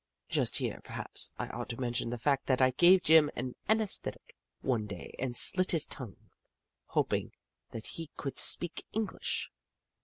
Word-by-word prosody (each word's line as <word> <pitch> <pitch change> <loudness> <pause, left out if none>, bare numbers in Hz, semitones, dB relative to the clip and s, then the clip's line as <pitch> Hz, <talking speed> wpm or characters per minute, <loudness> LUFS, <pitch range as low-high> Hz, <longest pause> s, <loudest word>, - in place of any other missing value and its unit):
Just - - +2
here, - - -3
perhaps, - - -3
I - - -4
ought - - -6
to 115 - -5
mention 120 -2 -2
the 120 - -4
fact 140 +3 0
that 130 -2 +2
I 130 -1 +4
gave 180 +7 +5
Jim 155 -1 +6
an 125 +1 -4 0.2
anaesthetic 220 -2 0 0.3
one 115 -5 -1
day 100 -4 -9
and 125 -2 -3
slit 185 0 +6
his 160 -2 +2
tongue, 120 -8 -7 0.6
hoping - - -1 0.4
that 110 -2 -8
he 165 -2 -6
could 135 - -3
speak 175 -1 +3
English. 220 -2 -3
135 Hz, 160 wpm, -31 LUFS, 120-175 Hz, 0.6 s, Jim